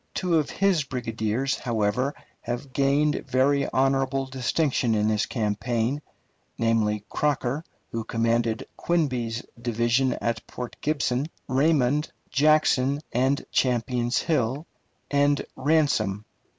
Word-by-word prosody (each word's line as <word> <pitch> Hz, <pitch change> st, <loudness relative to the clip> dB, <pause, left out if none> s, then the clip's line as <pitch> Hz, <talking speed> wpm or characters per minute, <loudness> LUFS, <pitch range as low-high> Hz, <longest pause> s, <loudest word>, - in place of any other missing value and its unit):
Two 175 Hz, -3 st, +2 dB
of 150 Hz, -, -2 dB
his 190 Hz, -6 st, +2 dB
brigadiers, 120 Hz, 0 st, -2 dB
however, 120 Hz, +4 st, 0 dB, 0.3 s
have 125 Hz, +3 st, -5 dB
gained 145 Hz, +2 st, +2 dB
very 140 Hz, +2 st, +2 dB
honorable 135 Hz, 0 st, +1 dB
distinction 130 Hz, -2 st, 0 dB
in 105 Hz, 0 st, +2 dB
this 105 Hz, -1 st, +1 dB
campaign, 115 Hz, +4 st, -1 dB, 0.6 s
namely 110 Hz, -2 st, +1 dB
Crocker, 145 Hz, +1 st, -1 dB, 0.3 s
who 115 Hz, 0 st, -3 dB
commanded 115 Hz, 0 st, 0 dB
Quinby's 125 Hz, -9 st, -1 dB, 0.2 s
division 120 Hz, +2 st, +1 dB
at 115 Hz, -1 st, -3 dB
Port 125 Hz, -1 st, -6 dB
Gibson, 140 Hz, -2 st, 0 dB, 0.2 s
Raymond, 145 Hz, +1 st, +2 dB, 0.2 s
Jackson, 145 Hz, -2 st, +3 dB
and 130 Hz, +3 st, +1 dB
Champion's 120 Hz, -1 st, +1 dB
Hill, 140 Hz, -1 st, 0 dB, 0.5 s
and 145 Hz, 0 st, +2 dB
Ransom. 130 Hz, -9 st, +1 dB
130 Hz, 105 wpm, -25 LUFS, 115-145 Hz, 0.6 s, Jackson